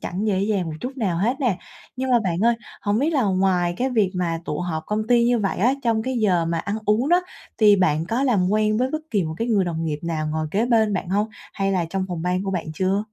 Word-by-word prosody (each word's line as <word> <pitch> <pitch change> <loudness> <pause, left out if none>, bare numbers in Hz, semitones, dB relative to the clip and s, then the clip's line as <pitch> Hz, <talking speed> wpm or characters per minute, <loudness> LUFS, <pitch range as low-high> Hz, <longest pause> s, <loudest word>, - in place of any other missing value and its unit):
chẳng 190 +5 -3
dễ 195 -3 +1
dàng 200 -2 0
một 160 - -4
chút 260 +2 -5
nào 190 -8 -1
hết 235 +7 +1
nè. 230 -9 +1 0.4
Nhưng 260 0 -2
mà 245 - +5
bạn 170 -3 0
ơi, 235 +1 +4 0.3
hổng 205 0 +1
biết 290 +6 +1
là 275 - +2
ngoài 185 -3 +1
cái 255 +4 0
việc 215 -6 +2
mà 170 -2 -1
tụ 150 -2 -3
họp 165 -3 -3
công 215 +1 -1
ty 240 -1 +4
như 240 0 +3
vậy 200 -3 -1
á, 240 +7 +3
trong 225 -2 +1
cái 260 +3 -2
giờ 185 -6 +2
mà 165 0 -1
ăn 200 +5 -3
uống 220 +6 +2
đó, 350 +2 +5 0.4
thì 210 -2 +6
bạn 160 -4 +2
có 235 +4 0
làm 210 -9 +2
quen 215 0 +2
với 255 - +1
bất 310 - -1
kỳ 205 -4 +1
một 160 0 -4
cái 230 +5 -2
người 205 -5 +3
đồng 165 -2 -3
nghiệp 150 -2 -2
nào 160 -2 -2
ngồi 155 0 -1
kế 210 +7 +1
bên 220 -3 +3
bạn 185 -3 -2
hông? 205 +4 +1 0.2
Hay 195 0 -1
là 180 -3 +1
trong 190 -1 -1
phòng 175 -3 -4
ban 180 +1 0
của 195 - -2
bạn 180 -4 -3
chưa? 190 +4 +1
200 Hz, 275 wpm, -23 LUFS, 180-230 Hz, 0.4 s, thì